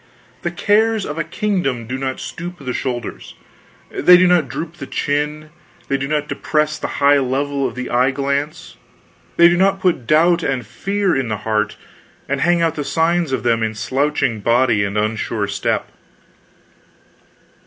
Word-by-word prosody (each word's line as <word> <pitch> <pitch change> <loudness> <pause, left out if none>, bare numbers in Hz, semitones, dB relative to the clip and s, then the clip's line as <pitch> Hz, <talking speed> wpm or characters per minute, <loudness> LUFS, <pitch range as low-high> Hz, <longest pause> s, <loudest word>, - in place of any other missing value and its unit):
The - - -1
cares 220 0 +2
of 150 +2 -5
a - - +1
kingdom 175 - -2
do 125 +3 -4
not 130 0 -3
stoop 175 +2 -6
the 130 -5 -5
shoulders, 120 -3 -5 0.6
they 180 0 +6
do 185 - +4
not 175 -5 +3
droop 165 +8 -6
the - - -7
chin, 150 +1 -2 0.4
they 140 - +1
do 135 0 -3
not 150 0 -1
depress 150 0 -1
the - - -3 0.2
high 140 0 +6
level 140 +1 -1
of - - -8
the 125 0 -5
eye 125 +2 +3
glance, 140 +2 -3 0.6
they 170 - +8
do 175 - +3
not 195 +1 +2
put 175 -10 0
doubt 170 +3 +4
and 130 -6 -2
fear 195 - -1
in 135 -2 -1
the 110 -2 -2
heart 110 -1 0 0.5
and 140 0 -1
hang 175 0 +3
out 165 -2 +2
the 150 - -4
signs 165 +1 +1
of 130 - -1
them 115 -1 +2
in 110 -1 -1
slouching 130 0 0
body 115 -1 +2
and 100 +1 -2
unsure 110 0 -1
step. 100 - -2
145 Hz, 170 wpm, -19 LUFS, 125-170 Hz, 0.6 s, they